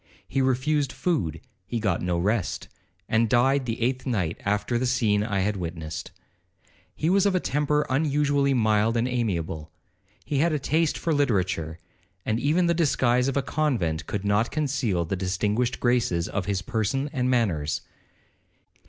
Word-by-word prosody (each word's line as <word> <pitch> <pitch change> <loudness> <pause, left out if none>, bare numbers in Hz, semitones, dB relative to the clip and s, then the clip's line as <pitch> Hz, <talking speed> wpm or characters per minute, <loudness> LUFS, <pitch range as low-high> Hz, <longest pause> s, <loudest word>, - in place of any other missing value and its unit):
He 135 - 0
refused 130 +2 +1
food, 85 - -1 0.3
he 120 - -2
got 100 -6 0
no 90 -1 0
rest, 95 -1 -1 0.4
and 110 0 +2
died 130 +2 +3
the 115 - -2
eighth 125 +3 -1
night 95 -10 -1
after 105 +4 0
the 130 - 0
scene 110 -5 +2
I 105 -3 -1
had 105 +1 0
witnessed. 80 -3 -5 0.9
He 155 - -1
was 195 +3 +4
of 195 - +1
a - - +3
temper 150 0 +1
unusually 140 -1 +2
mild 110 0 +2
and 115 +2 +1
amiable—he 95 - -4
had 165 +2 +2
a - - +2
taste 155 +3 +1
for 165 - -1
literature, 95 - 0 0.5
and 110 +1 0
even 155 +7 +2
the 170 - +3
disguise 130 -6 +2
of 135 - 0
a 140 - +1
convent 115 - -1
could 100 -1 -3
not 105 +3 +2
conceal 130 - 0
the 95 - -2
distinguished 105 +6 -1
graces 120 -9 +1
of 100 -3 -3
his 95 -3 -1
person 115 +8 -1
and 125 -3 0
manners. 90 - 0
120 Hz, 160 wpm, -26 LUFS, 95-140 Hz, 0.9 s, was